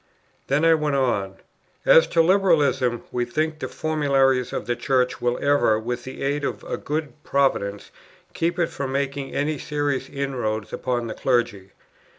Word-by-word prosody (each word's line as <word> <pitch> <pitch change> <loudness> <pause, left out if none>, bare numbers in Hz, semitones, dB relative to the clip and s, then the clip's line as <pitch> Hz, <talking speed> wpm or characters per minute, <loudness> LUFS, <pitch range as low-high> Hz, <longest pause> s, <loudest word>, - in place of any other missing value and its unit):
Then 145 +4 +2
I 165 - +6
went 150 -2 0
on: 100 -8 0 0.5
"As - - +7
to 165 - +3
Liberalism, 155 -10 +2
we 125 - 0
think 155 +6 -2
the - - -3
formularies 135 -5 +1
of - - -4
the 120 +2 -1
Church 125 +1 0
will 120 0 +1
ever, 130 -6 +3
with 120 +2 -4
the 130 - -7
aid 145 +1 -1
of - - -3
a - - -3
good 150 -3 -4
Providence, 100 -8 0 0.4
keep 170 +1 -1
it 170 -2 +1
from 135 -2 -4
making 140 0 -3
any 145 0 -1
serious 145 -2 -2
inroads 120 -7 -3
upon 120 -2 -2
the 115 - -4
clergy. 120 -7 -1
135 Hz, 165 wpm, -23 LUFS, 120-150 Hz, 0.5 s, As